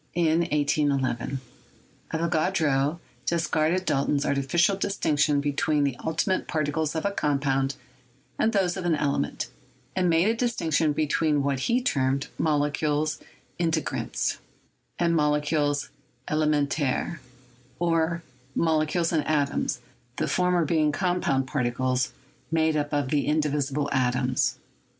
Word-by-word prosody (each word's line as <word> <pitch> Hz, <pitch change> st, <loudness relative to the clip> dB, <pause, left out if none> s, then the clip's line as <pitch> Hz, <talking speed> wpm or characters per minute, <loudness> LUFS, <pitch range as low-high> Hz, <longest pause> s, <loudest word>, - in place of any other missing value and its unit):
Avogadro 145 Hz, -6 st, +1 dB, 1.9 s
discarded 170 Hz, +2 st, +1 dB
Dalton's 140 Hz, -1 st, +1 dB
artificial 170 Hz, +8 st, +2 dB
distinction 155 Hz, -7 st, +1 dB
be 145 Hz, 0 st, -1 dB
tween 150 Hz, +1 st, +1 dB
the 140 Hz, -3 st, 0 dB
ultimate 165 Hz, +4 st, 0 dB
particles 155 Hz, 0 st, -1 dB
of 160 Hz, -, -2 dB
a 200 Hz, -, +2 dB
compound 140 Hz, -5 st, 0 dB, 0.6 s
and 220 Hz, -, +3 dB
those 190 Hz, -5 st, +1 dB
of 190 Hz, -, -4 dB
an 170 Hz, -2 st, +3 dB
element, 140 Hz, -, -1 dB, 0.4 s
and 185 Hz, -1 st, +2 dB
made 165 Hz, +3 st, +3 dB
a 225 Hz, -, +3 dB
distinction 165 Hz, -, +1 dB
between 150 Hz, 0 st, +1 dB
what 140 Hz, -1 st, 0 dB
he 235 Hz, -, +2 dB
termed 135 Hz, -, 0 dB
"molecules 150 Hz, 0 st, +1 dB, 0.4 s
integrants" 165 Hz, -2 st, -1 dB, 0.6 s
and 170 Hz, -1 st, +2 dB
"molecules 150 Hz, -1 st, +1 dB, 0.4 s
elemen 155 Hz, -1 st, +2 dB
taires," 145 Hz, +3 st, -1 dB, 0.6 s
or 165 Hz, 0 st, +1 dB, 0.3 s
molecules 160 Hz, +1 st, +1 dB
and 155 Hz, -2 st, +2 dB
atoms, 145 Hz, -4 st, 0 dB, 0.3 s
the -, -, -1 dB
former 180 Hz, -2 st, +2 dB
being 155 Hz, -1 st, +2 dB
com 180 Hz, +3 st, 0 dB
pound 135 Hz, -1 st, +1 dB
particles 130 Hz, -1 st, 0 dB, 0.4 s
made 160 Hz, -1 st, +2 dB
up 145 Hz, -1 st, -1 dB
of 145 Hz, -3 st, 0 dB
the 145 Hz, 0 st, +1 dB
indivisible 150 Hz, -1 st, 0 dB
atoms. 130 Hz, 0 st, +1 dB
150 Hz, 115 wpm, -26 LUFS, 140-165 Hz, 1.9 s, and